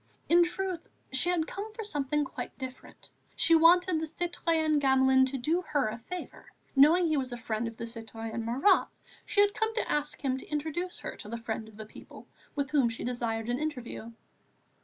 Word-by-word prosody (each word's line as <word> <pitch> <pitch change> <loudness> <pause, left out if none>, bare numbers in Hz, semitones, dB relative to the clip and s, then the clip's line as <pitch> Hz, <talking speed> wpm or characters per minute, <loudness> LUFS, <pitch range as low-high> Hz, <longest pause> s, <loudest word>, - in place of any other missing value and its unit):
In 345 +1 +6
truth 360 0 -3 0.2
she 265 +7 +3
had 345 -3 +1
come 410 +6 -6
for 445 - -5
something 295 -6 -1
quite - - -7
different. 260 -1 -10 0.2
She 330 - +4
wanted 335 +1 +6
the 320 - -2
citoyen 325 -2 0
Gamelin 265 -1 +4
to 270 +1 -3
do 315 +8 +1
her 285 -9 0
a 225 +2 -6
favour; 360 +10 -8 0.3
knowing 315 +6 +6
he 310 -2 +1
was 260 -2 -2
a 245 - -4
friend 225 0 -2
of 230 0 -8
the 230 - -4
citoyen 225 0 -5
Marat, 265 - +3 0.4
she 405 - +3
had 410 0 +3
come 445 0 0
to 455 - -1
ask 295 0 -1
him 265 -2 0
to - - -12
introduce 320 +4 -3
her - - -5
to 210 - -9
the 235 - -4
Friend 225 -1 -4
of 215 -1 -15
the 215 - -7
People, 215 - -13 0.3
with 280 -2 -2
whom 275 -6 +3
she 225 - -6
desired 235 -2 -2
an 245 +2 -1
interview. 250 -6 -5
285 Hz, 200 wpm, -29 LUFS, 235-335 Hz, 0.4 s, In